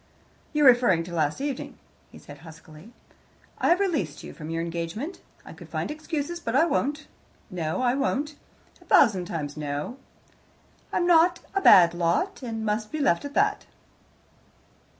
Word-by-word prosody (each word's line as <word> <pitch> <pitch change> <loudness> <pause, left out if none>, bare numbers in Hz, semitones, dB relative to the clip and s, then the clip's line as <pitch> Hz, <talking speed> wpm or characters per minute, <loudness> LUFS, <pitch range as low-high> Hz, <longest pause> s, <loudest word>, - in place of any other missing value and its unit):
"You're 300 -2 +2
referring 240 -9 +5
to 175 +1 -9
last 155 - -1
evening," 280 -2 -4 0.3
he - - -14
said 145 0 -13
huskily. 160 +4 -14 0.7
"I - - +1
have 350 - +4
released 250 - -2
you - - -9
from 155 0 -9
your 165 0 -2
engagement. 170 - -5 0.2
I - - -10
could - - -13
find - - -3
excuses, 310 +2 -4
but 230 -7 -3
I 310 +5 +5
won't. 295 -1 -1 0.5
No, 170 +6 -2
I 245 -1 +2
won't. 280 +2 -1 0.5
A - - -19
thousand 190 -5 +4
times 150 -4 -5
no. 150 - -4 0.9
I'm 350 - 0
a 350 +1 +5 0.3
bad 170 -2 +7
lot, 175 - -1
and 225 -3 -5
must 215 0 -2
be 310 - -4
left 275 -7 +1
at 285 - -8
that." 415 +1 +1
230 Hz, 155 wpm, -25 LUFS, -, 0.9 s, bad